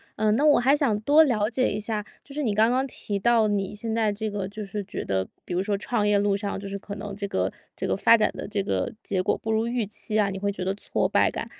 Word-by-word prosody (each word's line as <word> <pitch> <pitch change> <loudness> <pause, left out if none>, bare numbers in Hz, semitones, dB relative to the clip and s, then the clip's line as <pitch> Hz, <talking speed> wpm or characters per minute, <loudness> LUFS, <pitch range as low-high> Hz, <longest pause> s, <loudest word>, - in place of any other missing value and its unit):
呃， 215 0 +1
那 235 +7 +2
我 295 - +6
还 265 +4 +4
想 255 -9 +1
多 295 +7 +6
了 220 -6 +1
解 255 +2 +1
一 210 - -2
下， 210 -1 -3 0.2
就 275 - -12
是 300 - -1
你 215 -4 +1
刚 220 +2 +4
刚 260 +2 +1
提 205 -4 -3
到 230 +1 +3
你 200 -2 -1
现 220 +1 -4
在 220 -2 +2
这 215 +1 -3
个 205 -2 -3
就 210 0 -6
是 205 +1 -4
觉 190 - -5
得， 95 -1 0 0.2
比 180 - -5
如 180 - +1
说 200 0 0
创 210 0 -1
业 205 -1 +3
路 200 0 +2
上 200 -1 -3
就 200 - -7
是 200 0 -4
可 200 0 -8
能 200 -1 -6
这 200 - -4
个 - - 0 0.3
这 - - -3
个 - - +1
发 230 - +6
展 215 - +2
的 - - -6
这 205 -1 -1
个 95 - -1
结 185 -1 -1
果 - - +1
不 220 - -7
如 220 +1 +1
预 235 -1 -1
期 215 +1 -2
啊， 205 -2 +3
你 195 - -4
会 200 +1 -1
觉 185 -2 -5
得 190 - 0
挫 - - -1
败 - - +3
感， - - -4
210 Hz, 310 characters per minute, -25 LUFS, 200-225 Hz, 0.3 s, 我